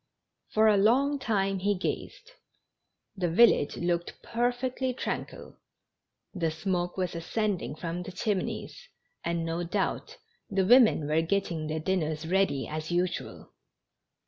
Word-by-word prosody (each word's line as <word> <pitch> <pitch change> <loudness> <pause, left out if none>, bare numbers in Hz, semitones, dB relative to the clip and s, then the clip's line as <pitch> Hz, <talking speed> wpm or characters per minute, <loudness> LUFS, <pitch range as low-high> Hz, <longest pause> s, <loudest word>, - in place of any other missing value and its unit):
For 220 +1 +4
a 210 -2 +5
long 270 +8 +3
time 195 -5 0
he 205 +2 +1
gazed. - - -4 0.8
The 180 -3 -1
village 170 -5 +4
looked 175 0 -2
perfectly 245 +2 -1
tranquil; - - -5 0.8
the 170 -5 0
smoke 175 +2 -2
was 185 -1 -1
ascending 180 0 -2
from 170 +2 -4
the 180 - -7
chimneys, 205 - -3 0.4
and, 170 -1 -1
no 165 +1 -2
doubt, 445 - -2 0.3
the 195 -1 +1
women 230 - +6
were 155 +2 +2
getting 165 -3 -1
their 155 +1 -2
dinners 160 -2 -1
read}^ 180 -6 +1
as 155 +1 -5
usual. 175 +1 -2
185 Hz, 125 wpm, -28 LUFS, 165-220 Hz, 0.8 s, women